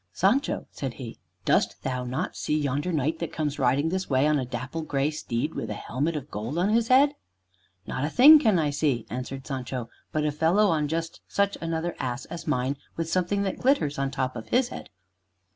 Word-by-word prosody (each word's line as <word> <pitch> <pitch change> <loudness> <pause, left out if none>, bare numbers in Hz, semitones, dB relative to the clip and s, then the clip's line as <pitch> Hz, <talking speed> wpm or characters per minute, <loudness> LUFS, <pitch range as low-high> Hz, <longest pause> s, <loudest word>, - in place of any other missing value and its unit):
"Sancho," 240 - +1
said 135 -4 -5
he, 120 -4 -8 0.3
"dost - - +1
thou 125 -1 -2
not 125 +1 -3
see 150 - -1
yonder 145 +3 -1
knight 155 +1 0
that 170 - -3
comes 150 -2 -2
riding 135 +5 +2
this 190 +2 -2
way 135 0 +3
on 150 -1 +3
a 130 - -2
dapple 130 +5 -4
gray 145 -1 0
steed, 150 0 -3
with - - -4
a - - -3
helmet 150 +7 -2
of 145 -1 -6
gold 110 +9 -4
on 180 +4 +2
his 225 +1 +2
head?" 275 +3 +5 0.7
"Not 130 - -3
a 150 - 0
thing 295 - +9
can 220 -9 +3
I 150 -3 +1
see," 140 -5 0
answered 130 +3 -5
Sancho, 130 -3 -4 0.2
"but 155 -1 0
a 150 - +1
fellow 165 +8 +3
on 155 -3 +1
just 165 +2 -3
such 200 0 +1
another 165 +1 -2
ass 125 0 -3
as 170 - -8
mine, 135 -1 0 0.2
with 165 0 -2
something 185 +2 +1
that 195 - -3
glitters 245 - +2
on 135 0 0
top 130 -2 -2
of 110 - -7
his 250 0 +2
head." - - -8
150 Hz, 210 wpm, -26 LUFS, 130-175 Hz, 0.7 s, thing